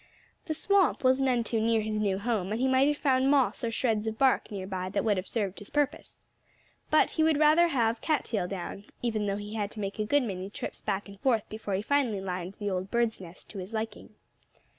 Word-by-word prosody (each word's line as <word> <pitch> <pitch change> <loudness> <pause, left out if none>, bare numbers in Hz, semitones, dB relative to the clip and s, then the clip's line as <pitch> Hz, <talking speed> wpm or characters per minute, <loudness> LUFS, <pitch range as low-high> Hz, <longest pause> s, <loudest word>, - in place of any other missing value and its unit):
The 315 - -1
swamp 385 -2 +2
was 260 +1 +4
none 250 -3 +2
too 225 -1 -1
near 225 0 +2
his 215 0 -2
new 200 -3 +1
home; 205 -3 -1
and 220 - -1
he 260 - +2
might 260 +1 +4
have 295 0 +1
found 265 -2 +2
moss 275 -4 +2
or 235 - +1
shreds 220 -2 0
of 220 0 -3
bark 265 0 +3
near 195 -3 -5
by 185 -1 -4
that 200 +2 -1
would 210 -2 +3
have 185 - -3
served 205 -5 -2
his 205 - -11
purpose. 290 0 -1 0.7
But 310 - +4
he - - -1
would 315 -2 +3
rather 310 +3 +5
have 230 -7 +1
cat 310 -4 0
tail 200 -6 -1
down, 195 +1 -6 0.2
even 215 -3 0
though 200 0 -1
he 205 +1 -7
had 210 -2 -2
to 215 - -9
make 200 +1 -4
a 215 - +1
good 285 +5 +3
many 190 -4 -4
trips - - -7
back 200 0 -2
and 200 -1 -12
forth 230 -4 +1
before 215 -2 -3
he 195 - -2
finally 250 -5 +1
lined 185 0 -4
the 205 -1 -2
old 185 +1 -2
bird's 235 -3 0
nest 175 -1 -12
to 200 - -7
his 190 +4 -7
liking. 220 -1 -5
220 Hz, 240 wpm, -29 LUFS, 200-260 Hz, 0.7 s, rather